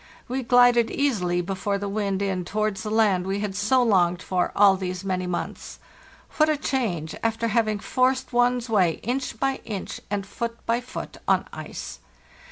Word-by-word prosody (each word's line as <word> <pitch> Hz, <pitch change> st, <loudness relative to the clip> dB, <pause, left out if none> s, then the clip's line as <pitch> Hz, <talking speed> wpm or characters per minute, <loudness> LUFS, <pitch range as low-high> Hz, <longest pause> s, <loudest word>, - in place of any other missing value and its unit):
We 260 Hz, +2 st, -2 dB
glided 245 Hz, -1 st, +5 dB
easily 180 Hz, -11 st, 0 dB
before 195 Hz, +2 st, -2 dB
the 200 Hz, 0 st, -4 dB
wind 200 Hz, -1 st, -1 dB
in 190 Hz, -2 st, -1 dB
towards 215 Hz, +2 st, -1 dB
the 215 Hz, -, -4 dB
land 205 Hz, -4 st, +2 dB
we 195 Hz, +1 st, -1 dB
had 205 Hz, -2 st, -3 dB
so 215 Hz, +6 st, +3 dB
longed 180 Hz, -6 st, +3 dB
for 180 Hz, -1 st, 0 dB
all 200 Hz, -1 st, +6 dB
these 185 Hz, -1 st, -4 dB
many 185 Hz, -1 st, -1 dB
months. 180 Hz, -, -5 dB, 0.6 s
What 310 Hz, 0 st, +4 dB
a 305 Hz, -, +2 dB
change, 190 Hz, -, -2 dB
after 230 Hz, 0 st, 0 dB
having 215 Hz, -1 st, +1 dB
forced 255 Hz, +4 st, 0 dB
one's 245 Hz, 0 st, +2 dB
way 190 Hz, -7 st, +3 dB
inch 250 Hz, -1 st, -2 dB
by 270 Hz, -1 st, 0 dB
inch 200 Hz, -4 st, -5 dB
and 200 Hz, -1 st, -2 dB
foot 230 Hz, +3 st, -4 dB
by 235 Hz, +1 st, +1 dB
foot 250 Hz, -, -7 dB
on -, -, +3 dB
ice! -, -, -7 dB
210 Hz, 175 wpm, -25 LUFS, 190-245 Hz, 0.6 s, all